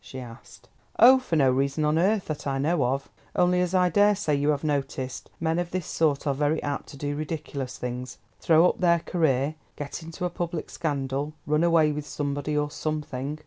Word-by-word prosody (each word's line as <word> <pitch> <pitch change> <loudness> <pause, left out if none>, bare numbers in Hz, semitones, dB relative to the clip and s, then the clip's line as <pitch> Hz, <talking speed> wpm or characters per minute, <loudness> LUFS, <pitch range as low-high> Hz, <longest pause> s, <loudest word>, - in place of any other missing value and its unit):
she 130 - -8
asked. 120 -2 -12 0.3
"Oh, 260 +2 +8
for 255 -10 -2
no 135 -4 +4
reason 140 +3 0
on 150 +2 +2
earth, 200 +3 +2
that 150 -2 -5
I 135 -1 0
know 150 +3 +1
of; 135 +2 -2 0.2
only, 180 0 +3
as 180 +1 0
I 180 -1 +4
daresay 205 -2 +3
you 145 +1 +1
have 145 -1 0
noticed, 135 -3 -3
men 160 +1 0
of 175 -1 -2
this 180 -2 -3
sort 150 -3 0
are 140 - +1
very 145 +3 +1
apt 145 -1 -3
to 140 - -10
do 145 +1 -3
ridiculous 145 -4 -5
things, 125 0 -5 0.2
throw 165 +1 +5
up - - -1
their 170 -2 +3
career, 155 -5 +1 0.2
get 145 +3 -6
into 165 +2 -5
a 175 - -2
public 170 -2 -4
scandal, 140 -1 -2
run 150 +2 +2
away 165 -3 +4
with 150 0 -5
somebody 145 0 -2
or 150 0 0
something. 150 -2 -3
150 Hz, 200 wpm, -26 LUFS, 140-170 Hz, 0.3 s, Oh